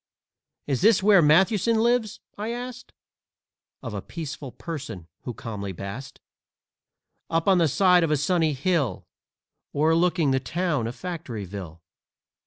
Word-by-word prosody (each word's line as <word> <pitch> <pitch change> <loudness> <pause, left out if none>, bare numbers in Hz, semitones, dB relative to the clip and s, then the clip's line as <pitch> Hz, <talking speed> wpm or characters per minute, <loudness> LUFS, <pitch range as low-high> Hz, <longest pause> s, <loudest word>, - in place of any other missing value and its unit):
"Is 140 -1 -1
this 205 -1 +5
where 200 -3 +7
Mathewson 190 +8 +4
lives?" 235 -1 +1
I 210 +2 -4
asked 245 +1 -7 0.9
Of - - -5
a - - -4
peaceful 150 -5 -7
person, 140 - -7 0.2
who 125 - -4
calmly 100 -4 -5
basked 100 +9 -7 1.1
Up 165 +2 0
on 190 -2 +5
the 165 - +4
side 180 +3 +4
of 165 - +1
a 150 - +2
sunny 160 +1 +1
hill 140 - 0 0.7
O'erlooking 165 +1 +3
the 130 - +2
town 155 -5 -1
of 120 - -6
Factoryville. 105 - -6
160 Hz, 130 wpm, -25 LUFS, 130-185 Hz, 1.1 s, where